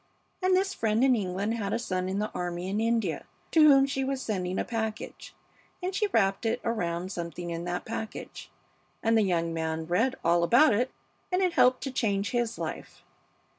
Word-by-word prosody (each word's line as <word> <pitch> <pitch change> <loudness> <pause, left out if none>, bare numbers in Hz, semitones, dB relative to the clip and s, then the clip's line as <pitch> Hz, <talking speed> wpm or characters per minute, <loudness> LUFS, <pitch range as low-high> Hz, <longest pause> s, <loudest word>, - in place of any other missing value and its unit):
And 370 0 +3
this 385 +1 0
friend 220 +2 +1
in 265 -2 +5
England 200 +1 -2
had 205 -4 -2
a - - +2
son 185 -5 -2
in 190 - -2
the 210 +1 -2
army 175 0 -4
in 205 +3 -1
India, 225 -6 0 0.2
to 320 - +5
whom 275 -3 +7
she 270 -1 -2
was 270 0 -2
sending 185 -6 -2
a - - -1
package, 220 -2 -5 0.4
and 370 +1 -3
she 420 +2 +1
wrapped 195 - +1
it 230 +2 0
around 180 -5 -2
something 170 -1 -5
in 170 +1 -4
that 175 0 -3
package, 220 -1 -6 0.5
and 225 -1 +3
the 220 - +5
young 170 -4 0
man 160 0 -2
read 225 +11 +1
all 170 +1 +4
about 240 - +5
it, 245 +5 +1 0.4
and 365 +1 +2
it 360 -2 +1
helped 255 -3 +4
to 270 - -3
change 205 -5 0
his 240 -2 -1
life. - - -6
220 Hz, 195 wpm, -28 LUFS, 180-250 Hz, 0.5 s, whom